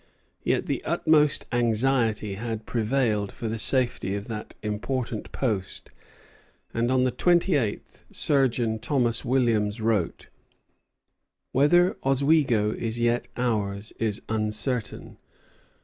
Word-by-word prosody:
Yet - - 0
the - - -3
utmost 150 -2 +2
anxiety 115 -3 +1
had 110 +1 -5
prevailed 110 -3 0
for 115 - -6
the 110 +1 -3
safety 120 -3 +2
of 100 +1 -5
that 105 -1 -6
important 115 +2 -3
post, 105 -8 -3 0.8
and 115 +1 0
on 130 0 +3
the 130 - +1
twenty 175 +6 +2
eighth 115 -7 -3
Surgeon 120 -6 +1
Thomas 120 -1 0
Williams 115 -4 +1
wrote: 110 -6 -1 1.2
"Whether 175 +7 +4
Oswego 135 -5 +2
is 115 +1 -4
yet 120 +1 +1
ours 105 -4 -2
is 110 -2 -1
uncertain. 110 +2 -2
115 Hz, 110 wpm, -26 LUFS, 105-130 Hz, 1.2 s, Whether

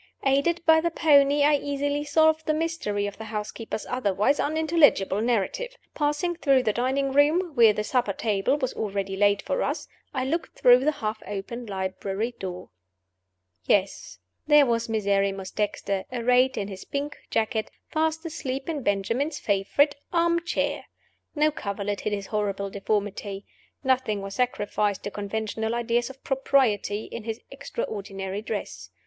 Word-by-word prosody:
Aided 280 +6 +2
by 320 0 +6
the 340 - +1
pony, 285 -3 +4
I 295 0 +5
easily 285 +1 -2
solved 315 +1 +3
the 310 - +2
mystery 310 -11 -1
of 205 +1 -6
the 220 - -6
housekeeper's 215 +1 -5
otherwise 230 +2 +1
unintelligible 300 - +3
narrative. 245 - -1 0.2
Passing 300 +4 0
through 270 -5 +3
the 215 -3 +1
dining 265 +3 0
room 315 +6 +3
(where 230 -4 +7
the 210 0 -2
supper 240 -2 +1
table 215 +6 0
was 260 -3 -2
already 195 -2 -3
laid 205 0 +3
for - - -1
us), - - -2 0.2
I 260 -2 -2
looked 325 +5 -3
through 245 0 +7
the 305 - +4
half 215 -6 -4
opened 210 +4 -5
library 195 +4 -3
door. 180 - -6 0.9
Yes, 195 -1 0 0.3
there 295 -1 +7
was 230 -1 0
Miserrimus 195 -3 0
Dexter, 200 -2 -2
arrayed 250 +2 +3
in 200 - -2
his 190 -2 -8
pink 285 +1 -4
jacket, 220 0 0 0.2
fast 320 +1 0
asleep 270 -4 -4
in 315 -4 -2
Benjamin's 230 +9 0
favorite 210 +9 +2 0.2
arm 340 0 +2
chair! 340 - -1 0.5
No 305 +1 +3
coverlet 200 -5 -3
hid 215 - -2
his 200 -1 -3
horrible 200 -2 -2
deformity. 200 -1 -2 0.4
Nothing 255 -6 +1
was 195 0 -6
sacrificed 210 -4 0
to 205 - -4
conventional 220 +2 -3
ideas 240 +1 0
of 265 0 -13
propriety 245 -6 +1
in 230 - -7
his 225 0 -4
extraordinary 195 - -5
dress. 215 -1 -5
235 Hz, 150 wpm, -26 LUFS, 205-290 Hz, 0.9 s, where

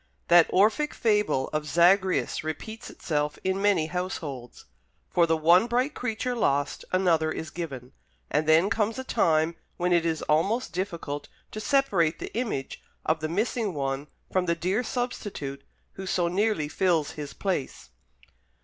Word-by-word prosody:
That 175 -1 +7
Orphic 220 +10 +2
fable 210 - +1
of 150 0 -2
Zagreus 180 +5 +3
repeats 190 +8 -6
itself 150 -2 -2
in 190 +1 0
many 200 -6 +3
households. 155 -8 -5 0.5
For 170 -1 +4
the 160 0 +2
one 170 +7 +5
bright 250 +5 0
creature 245 0 -2
lost 145 -9 0
another 170 -4 +2
is 155 0 -5
given; 135 -7 -6 0.4
and 150 +1 +1
then 165 +5 +5
comes 215 +1 0
a 260 - -4
time 160 -8 +2 0.2
when 180 0 +1
it 170 -1 +3
is 165 -2 -1
almost 195 +11 +1
difficult 170 -6 -4 0.2
to 215 - -5
separate 205 - +2
the - - -8
image 215 - -3 0.2
of 155 0 +1
the 155 +1 -3
missing 210 +1 -1
one 135 0 -2 0.2
from 185 -1 +1
the 170 - +2
dear 185 +7 0
substitute 205 - -4 0.3
who 190 0 -8
so 175 -2 +1
nearly 190 -3 +1
fills 160 -2 +1
his 145 -2 -7
place. 135 - -3
175 Hz, 150 wpm, -27 LUFS, 155-205 Hz, 0.5 s, That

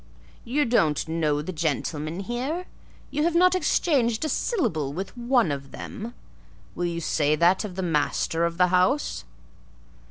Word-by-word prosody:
"You 275 +5 +1
don't 165 - +2
know 155 -2 0
the 185 - -4
gentlemen 155 +1 -2
here? 260 - -3 0.5
You 295 - -1
have 335 +2 +1
not 365 +1 +5
exchanged 275 -9 +1
a - - -1
syllable 160 - -1
with 190 +8 -5
one 240 - +2
of 140 -1 -5
them? 235 - -7 0.6
Will 175 - -2
you 170 -1 -3
say 150 -2 +1
that 175 +6 +3
of 200 -4 -6
the 190 - -3
master 165 0 0
of 170 0 -1
the 180 0 +4
house!" 185 +11 +1
185 Hz, 155 wpm, -25 LUFS, 160-250 Hz, 0.6 s, not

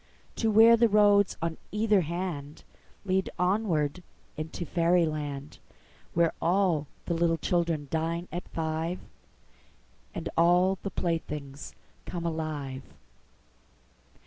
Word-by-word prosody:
To 225 - +1
where 225 +2 +8
the 230 0 +4
roads 205 -1 +4
on 165 -1 -2
either 210 -1 +3
handLead 175 +3 -4
onward 180 -4 0 0.3
into 160 +3 -5
fairy 170 +1 +3
land, 145 -2 -5 0.6
Where 170 -1 +3
all 175 -4 +2 0.2
the 170 -1 +1
children 165 -3 0
dine 165 +2 -1
at 175 - -6
five, 160 +2 -2 1.2
And - - -4
all 180 +3 +4
the 195 - -3
playthings 150 -6 -4 0.3
come 170 -1 -4
alive. 155 -5 -3
170 Hz, 100 wpm, -28 LUFS, 155-185 Hz, 1.2 s, where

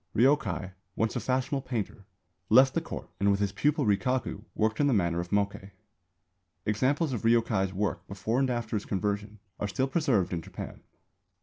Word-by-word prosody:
Ryōkai, 125 -6 +2 0.2
once 110 0 0
a - - +1
fashionable 130 +3 0
painter, 105 -5 -4 0.4
left 130 +4 +7
the 165 - +1
Court 165 - -7
and 100 - +3
with 100 0 +3
his 100 -1 +1
pupil 150 +7 +1
Rikaku 115 +1 0
worked 110 0 +1
in 145 - +4
the 135 - +3
manner 85 -3 +1
of 85 0 -4
Mokkei. 100 -1 -1 1.0
Examples 130 +7 +1
of 120 - -2
Ryōkai's 115 -4 +2
work 100 +1 -2
before 100 +5 -1
and 135 -1 +2
after 120 -3 -2
his 105 - -2
conversion 105 +1 -2 0.2
are 105 - -1
still 130 +7 0
preserved 130 - +1
in 85 - -2
Japan. - - -8
110 Hz, 175 wpm, -29 LUFS, 100-130 Hz, 1.0 s, left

